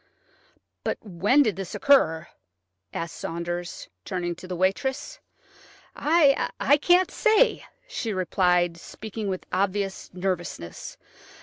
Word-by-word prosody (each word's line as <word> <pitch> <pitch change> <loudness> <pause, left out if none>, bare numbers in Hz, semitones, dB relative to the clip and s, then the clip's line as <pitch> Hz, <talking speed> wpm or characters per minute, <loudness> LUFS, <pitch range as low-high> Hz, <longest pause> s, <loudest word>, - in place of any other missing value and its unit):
"But - - -1
when 205 +8 +3
did 215 -8 -1
this 195 -2 -5
occur?" 170 - +3 0.6
asked 165 0 -5
Saunders, 175 +1 -5 0.2
turning 175 - -2
to 185 - -10
the 180 - -4
waitress. 265 - -1 0.8
"I 290 -2 +3
can't 360 +2 +4
say," 440 +3 +3 0.2
she 240 - -3
replied, 180 -2 +2
speaking 215 +4 -7
with 185 -1 -3
obvious 195 +1 -1
nervousness. 175 - -4
190 Hz, 105 wpm, -25 LUFS, 175-265 Hz, 0.8 s, can't